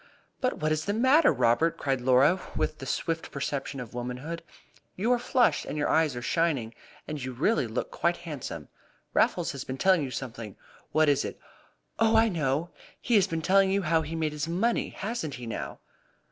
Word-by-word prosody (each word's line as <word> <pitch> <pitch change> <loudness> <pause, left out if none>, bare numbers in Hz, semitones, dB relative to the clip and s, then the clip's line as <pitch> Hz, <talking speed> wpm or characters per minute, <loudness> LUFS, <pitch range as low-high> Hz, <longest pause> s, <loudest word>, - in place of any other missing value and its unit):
"But 255 -1 0
what 155 0 0
is 155 0 0
the 205 - 0
matter, 260 +7 +5
Robert?" 125 +7 +2
cried 135 -2 -1
Laura, 130 +8 +4
with 155 - -1
the 135 - -7
swift 165 +5 -2
perception 140 0 -3
of 125 -2 -8
womanhood. 125 +7 -5 0.5
"You 220 +6 0
are 245 - +3
flushed, 245 0 +2
and - - -5
your 145 - 0
eyes 160 -4 +2
are 120 - -5
shining, 140 -6 0 0.3
and 150 -3 -5
really 180 - +2
you - - -7
look 110 - -3
quite 175 0 0
handsome. 155 -7 -7 0.4
Raffles - - +2
has - - -6
been 130 - -5
telling 185 +2 +4
you 135 - -3
something! 115 -5 -6 0.4
What 155 0 +3
was 140 -1 +3
it? - - -6 0.6
Oh, 225 0 +4
I 225 +1 +5
know! 155 -1 -1 0.3
He 240 - -2
has 200 -3 +5
been 165 -3 -3
telling 195 +2 +4
you 195 +1 +1
how 165 0 +2
he 160 +1 -5
made 160 -2 0
his 150 0 -3
money. 195 +8 0
Hasn't 195 - -4
he, 125 -1 -8
now?" 115 - -5
155 Hz, 195 wpm, -28 LUFS, 135-190 Hz, 0.6 s, matter